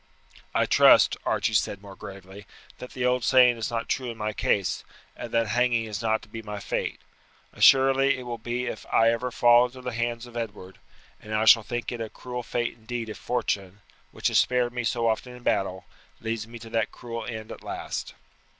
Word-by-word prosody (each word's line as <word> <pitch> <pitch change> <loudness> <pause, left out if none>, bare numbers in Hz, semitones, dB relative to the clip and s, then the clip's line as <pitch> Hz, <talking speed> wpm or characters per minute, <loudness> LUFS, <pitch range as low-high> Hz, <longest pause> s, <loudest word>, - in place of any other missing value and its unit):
"I - - +3
trust," - - +6
Archie - - +1
said 100 0 0
more 100 -1 -11
gravely, 95 +1 -11 0.3
"that 125 - -9
the 125 - -2
old 125 -1 +2
saying 125 -1 +5
is 110 - -3
not 115 -1 -3
true 130 -2 -2
in 115 - -7
my 105 0 -2
case, 100 -2 0 0.3
and 120 - -7
that 115 -2 +1
hanging 120 0 +2
is 105 -1 -5
not 110 -1 0
to - - -14
be 115 +1 -7
my 105 -1 -6
fate. 100 - -3 0.5
Assuredly 135 0 +5
it 130 - -7
will 120 -1 -5
be 120 +2 -3
if - - -6
I 115 0 +5
ever 120 +2 -2
fall 120 0 +5
into 130 +1 -13
the 125 -1 -5
hands 120 0 -2
of 120 -1 -14
Edward, 105 -5 -6 0.4
and 110 0 -5
I 110 +1 +1
shall 110 +1 +8
think 120 +1 -4
it 120 -1 -5
a 110 - -4
cruel 125 +2 -6
fate 120 0 -2
indeed 115 0 -6
if 110 - -7
fortune, 100 -5 -2 0.3
which - - -1
has - - +4
spared 125 -1 +1
me 125 0 -2
so 115 0 0
often 125 +3 -2
in 125 - -14
battle, 95 -4 -1 0.3
leads 110 -1 -3
me 120 +1 -9
to 115 0 -11
that 115 -1 0
cruel 115 -1 -6
end 110 -2 -6
at - - -9
last." - - -5
115 Hz, 210 wpm, -26 LUFS, 110-125 Hz, 0.5 s, shall